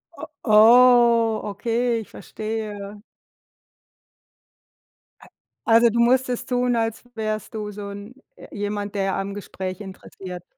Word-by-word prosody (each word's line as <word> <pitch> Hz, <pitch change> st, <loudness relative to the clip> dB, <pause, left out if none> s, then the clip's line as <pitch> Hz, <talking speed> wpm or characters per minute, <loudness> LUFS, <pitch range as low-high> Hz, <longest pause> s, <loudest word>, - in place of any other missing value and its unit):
O 315 Hz, -, -8 dB, 0.2 s
Oh, 235 Hz, 0 st, +5 dB
okay, 235 Hz, +2 st, -1 dB
ich 215 Hz, -, -13 dB
verstehe. 210 Hz, -2 st, -7 dB, 2.2 s
A -, -, -16 dB, 0.4 s
Also, 230 Hz, +1 st, +5 dB
du 235 Hz, +2 st, -1 dB
musstest 250 Hz, +1 st, +1 dB
tun, 245 Hz, -1 st, +1 dB
als 225 Hz, 0 st, -2 dB
wärst 215 Hz, 0 st, -4 dB
du 210 Hz, -1 st, -5 dB
so 205 Hz, 0 st, -8 dB
'n 200 Hz, +3 st, -9 dB, 0.2 s
äh, -, -, -13 dB
jemand, 205 Hz, 0 st, -4 dB
der 195 Hz, -1 st, -1 dB
am 195 Hz, +1 st, -4 dB
Gespräch 190 Hz, -2 st, -6 dB
interessiert 185 Hz, -2 st, -10 dB
215 Hz, 120 wpm, -22 LUFS, 205-235 Hz, 2.2 s, Oh